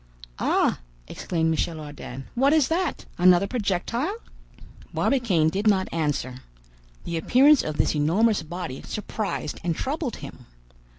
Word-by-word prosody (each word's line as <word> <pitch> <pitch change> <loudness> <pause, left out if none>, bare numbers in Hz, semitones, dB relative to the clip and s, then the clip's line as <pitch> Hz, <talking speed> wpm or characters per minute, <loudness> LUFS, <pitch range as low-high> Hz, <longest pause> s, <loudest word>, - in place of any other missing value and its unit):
"Ah!" - - +2 0.3
exclaimed 160 - -1
Michel 160 0 -1
Ardan, 145 -3 -8
"What 270 +4 +3
is 305 -4 +3
that? 335 0 -1
another 180 +1 +6
projectile?" 235 - -1 0.8
Barbicane 200 - +2
did 200 +6 -1
not 190 -3 +2
answer. 145 -6 -1 0.7
The 170 - -3
appearance 270 - +5
of 155 -1 -4
this - - +2
enormous 195 +9 +2
body 160 -5 -6
surprised 210 -6 -4
and 170 -2 0
troubled 280 - -3
him. 130 -3 -11
185 Hz, 125 wpm, -25 LUFS, 155-245 Hz, 0.8 s, another